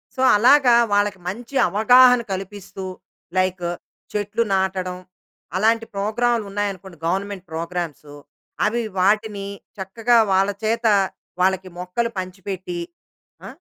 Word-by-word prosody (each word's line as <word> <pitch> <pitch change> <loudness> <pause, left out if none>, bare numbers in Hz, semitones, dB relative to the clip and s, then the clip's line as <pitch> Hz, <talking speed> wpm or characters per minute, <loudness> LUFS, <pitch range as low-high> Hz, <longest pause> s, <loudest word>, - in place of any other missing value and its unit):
So, 260 - -3
అలాగా, 250 +2 +6 0.2
వాళ్ళకి 205 -1 +1
మంచి 230 +8 -6
అవగాహన 245 +4 +6
కలిపిస్తూ, 195 0 -6 0.5
లైక్ 185 -1 0 0.5
చెట్లు 210 +2 0
నాటడం 190 -1 -1 0.6
అలాంటి 225 +3 +2
ప్రోగ్రామ్‌లు 225 +3 0
ఉన్నాయనుకోండి, 195 -3 -4
గవర్నమెంట్ 190 +2 -2
ప్రోగ్రామ్‌సు 165 -3 -5 0.5
అవి. 235 +3 +1 0.2
వాటిని 205 +1 +1 0.3
చక్కగా 225 +5 +1 0.2
వాళ్ళ 195 +1 +3
చేత 230 +2 0 0.6
వాళ్ళకి 190 0 +1
మొక్కలు 180 +7 -2
పంచిపెట్టి, 190 - -5 0.7
ఆ! - - -7
200 Hz, 100 wpm, -22 LUFS, 185-225 Hz, 0.7 s, అలాగా